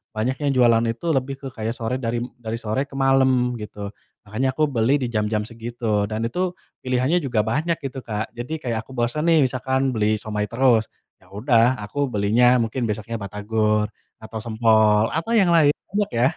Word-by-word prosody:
banyak 120 +5 0
yang 140 - +3
jualan 120 -2 +4
itu 115 +8 -4
lebih 135 -1 -1
ke 135 - -7
kayak 110 0 -3
sore 115 +2 -2
dari 120 -1 -2
m 125 - -8
dari 115 -1 -4
sore 110 +5 -1
ke 135 - -13
malem 130 -2 +3
gitu. 105 -1 -7 0.3
Makanya 125 +6 -1
aku 155 +1 +3
beli 125 +1 +2
di 125 - 0
jam-jam 105 -1 0
segitu 115 -2 -2
dan 110 +1 -3
itu 180 +9 -1 0.3
pilihannya 130 +7 +1
juga 120 -5 +1
banyak 160 +8 0
gitu, 135 -1 -5
Kak. 110 -1 -4
Jadi 150 +7 -4
kayak 115 -3 -2
aku - - -16
bosan 125 +7 -1
nih 160 - +5
misalkan 130 +1 -1
beli 110 0 +2
siomay 105 -1 -3
terus, 120 -3 +3 0.3
ya 90 - -23
udah 120 +3 +2
aku 140 +7 -2
belinya 120 +4 +3
mungkin 115 +3 -3
besoknya 105 +2 -4
batagor 105 +1 0 0.3
atau 110 0 -7
sempol 110 -1 +3
atau 165 +9 -2
yang 195 -5 +4
lain, 150 -3 +5 0.2
banyak 205 0 -1
ya. 125 +4 +4
120 Hz, 185 wpm, -22 LUFS, 110-135 Hz, 0.3 s, nih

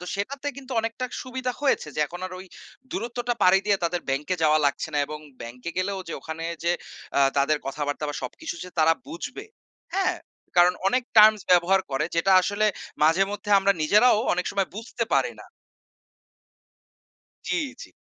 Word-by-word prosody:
তো - - -7
সেটাতে 270 +8 -4
কিন্তু 270 -1 -8
অনেকটা 230 +3 -4
সুবিধা 255 0 -3
হয়েছে 270 - +1
যে, - - 0
এখন 175 +3 -9
আর 185 - -10
ওই 190 - -10 0.4
দূরত্বটা 240 +1 -2
পাড়ি 185 +1 +6
দিয়ে 205 -1 +4
তাদের 175 +1 0
ব্যাংকে 145 +7 0
যাওয়া 155 0 +5
লাগছে 140 +3 -1
না - - +2
এবং 150 0 -6 0.2
ব্যাংকে 125 +7 -7
গেলেও 195 +1 -1
যে - - -4
ওখানে 160 +1 -6 0.2
যে 170 - +3 0.5
আ - - +4 0.2
তাদের 140 +2 +2
কথাবার্তা 145 +2 -3
বা 145 - -4
সবকিছু 125 +6 -5
যে - - -9
তারা 160 +1 +5
বুঝবে, 250 - -7 0.5
হ্যা? 385 -1 +2 0.5
কারণ 175 +1 +6
অনেক 250 +5 +1
terms 215 -1 +8
ব্যবহার 180 +2 +5
করে 135 +3 0
যেটা 180 +4 +3
আসলে 205 +3 +1 0.4
মাঝেমধ্যে 195 +6 +2
আমরা 195 +1 +3
নিজেরাও 210 +8 +5
অনেক 180 0 -1
সময় 195 -2 0
বুঝতে 230 +2 -4
পারি - - +2
না। - - -12 2.0
জি, - - +1 0.3
জি। - - -10
190 Hz, 165 wpm, -25 LUFS, 160-225 Hz, 2.0 s, terms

